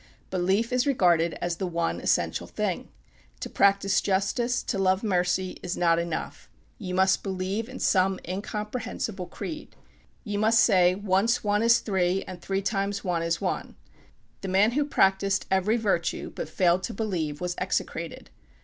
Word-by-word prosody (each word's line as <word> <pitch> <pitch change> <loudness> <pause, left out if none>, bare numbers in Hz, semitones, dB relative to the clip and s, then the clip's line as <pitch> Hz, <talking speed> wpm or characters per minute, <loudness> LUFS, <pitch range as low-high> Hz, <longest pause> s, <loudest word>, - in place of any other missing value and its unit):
Belief 190 +6 +1
is 250 +2 +2
regarded 175 -10 +3
as 175 -1 -1
the 190 - -2
one 170 - -2
essential - - 0
thing. - - -3 0.5
To - - -6
practice 200 0 +3
justice, 205 +6 0
to 195 - -2
love 190 +1 +2
mercy, 185 -2 0
is 180 0 -4
not 170 -1 +3
enough. 170 0 -5 0.3
You 180 -4 -4
must 190 0 +3
believe 195 +4 -3
in 260 - -8
some 190 -1 +2
incomprehensible 210 0 -4
creed. 310 -1 -7 0.5
You 205 -3 -3
must 220 +1 +4
say, 180 -4 +4
"Once 200 +4 +1
one 210 0 +1
is 230 +1 +5
three, 190 -2 0
and 180 -2 -9
three 195 +1 -2
times 200 0 -1
one 175 -3 -1
is 165 0 -1
one." - - -3 0.7
The 195 - -5
man 195 +4 +3
who 290 +3 +1
practiced 195 -6 +2
every 190 +4 +2
virtue, 195 -7 -1
but - - -5
failed 175 +2 +2
to - - -6
believe, 170 -9 -2
was 180 0 -2
execrated. - - -3
195 Hz, 160 wpm, -26 LUFS, 180-210 Hz, 0.7 s, is